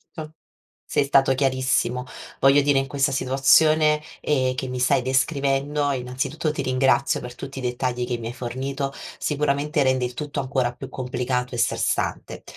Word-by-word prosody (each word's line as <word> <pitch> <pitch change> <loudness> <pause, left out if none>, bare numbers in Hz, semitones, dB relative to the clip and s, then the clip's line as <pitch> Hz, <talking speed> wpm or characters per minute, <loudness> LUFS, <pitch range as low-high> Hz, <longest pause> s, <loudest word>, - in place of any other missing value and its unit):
Tol 155 -1 -7 0.5
sei 145 - +1
stato 135 -1 +4
chiarissimo, 130 -2 0 0.4
voglio 135 +2 +5
dire 140 -1 +2
in 135 - +1
questa 135 0 0
situazione, 150 +4 +4 0.2
ehm, 130 -4 +1
che 130 +1 -4
mi 125 0 -4
stai 125 +2 +2
descrivendo, 140 +2 0
innanzitutto, 130 +5 -2
ti 150 - -3
ringrazio 130 +1 +2
per 125 0 -8
tutti 135 +2 -9
i 135 - -4
dettagli 125 0 -2
che 120 -1 -3
mi 115 - -5
hai 120 - -5
fornito, 135 +3 -4 0.2
sicuramente 150 +1 0
rende 130 -1 +2
il 125 - -5
tutto 145 +3 -4
ancora 130 -2 0
più - - -9
complicato 125 -1 -3
e - - -4
stressante. 120 - -1
135 Hz, 160 wpm, -23 LUFS, 125-140 Hz, 0.5 s, voglio